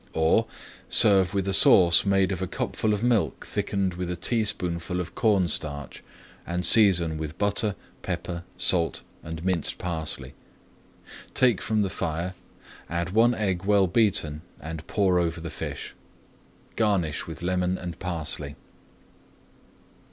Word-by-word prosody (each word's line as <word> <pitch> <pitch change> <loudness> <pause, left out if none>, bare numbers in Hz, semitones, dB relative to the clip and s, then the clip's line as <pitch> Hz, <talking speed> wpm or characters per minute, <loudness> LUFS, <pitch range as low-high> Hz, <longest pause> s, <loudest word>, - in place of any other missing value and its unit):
Or, 80 +8 +2 0.4
serve 95 -2 +5
with 100 -1 -1
a 95 - 0
sauce 90 -1 +7
made 95 -1 +2
of 95 -1 -4
a 95 - -2
cupful 110 +4 -2
of 105 +1 -1
milk 120 -4 0
thickened 95 -2 -2
with 90 0 -5
a 90 - -2
teaspoonful 90 -4 -1
of 90 -1 -5
cornstarch, 85 - -1 0.4
and 90 0 -3
season 85 -7 +4
with 80 0 -6
butter, 100 0 0 0.3
pepper, 85 -1 -4 0.2
salt, 85 -3 +1 0.2
and 80 +1 -7
minced 90 -4 0
parsley. 80 -6 -4 1.0
Take 120 -6 +3
from 110 -1 0
the 95 - -2
fire, 85 +3 -3 0.6
add 85 +1 -3
one 115 +4 +3
egg 95 -4 -2
well 100 -1 +4
beaten, 90 -7 0 0.2
and 80 0 -8
pour 95 -4 +2
over 85 -1 -1
the 85 0 -7
fish. 65 - -6 0.8
Garnish 95 -9 0
with 80 +1 -8
lemon 90 0 0
and 85 -2 -7
parsley. 85 -4 -3
90 Hz, 135 wpm, -25 LUFS, 85-100 Hz, 1.0 s, sauce